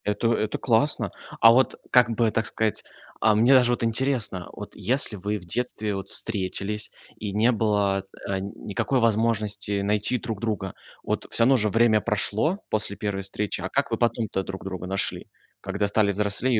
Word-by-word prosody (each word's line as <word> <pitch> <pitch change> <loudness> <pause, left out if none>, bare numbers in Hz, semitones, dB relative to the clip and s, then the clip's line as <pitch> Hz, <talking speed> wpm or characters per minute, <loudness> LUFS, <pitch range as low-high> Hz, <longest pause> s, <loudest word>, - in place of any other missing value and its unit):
Это 105 +3 +1
это 110 -1 -1
классно. 120 +4 +1 0.3
А 115 - +9
вот 130 +3 +2
как 125 -2 +5
бы 115 -1 +2
так 115 0 0
сказать, 110 -1 -1 0.4
а 110 -1 +4
мне 120 +5 +5
даже 125 -2 +6
вот 120 - -1
интересно: 115 -6 -1
вот - - -9
если 120 +1 0
вы 105 +2 -3
в 90 - -11
детстве 110 +1 -2
вот 95 - -5
встретились, 105 0 -2 0.3
и 105 -2 -4
не 110 +4 +3
было, 105 -4 +1 0.2
э, 95 -1 -1
никакой 100 +6 -2
возможности 105 -3 +1
найти 105 +4 +1
друг 110 -3 -5
друга- 105 -4 -3 0.3
вот, - - -3
всё 115 - +2
равно 130 +2 +5
же 105 -2 +1
время 110 0 +3
прошло 110 - +1
после 105 -1 0
1 100 -3 -2
встречи,- 100 0 -3
а 95 - -3
как 140 +2 0
вы 115 - 0
потом-то 115 -4 0
друг 95 0 -7
друга 95 -1 -5
нашли, 95 +1 -1 0.3
когда 100 - -1
стали 100 0 +2
взрослее 105 +5 +2
105 Hz, 175 wpm, -25 LUFS, 100-115 Hz, 0.4 s, А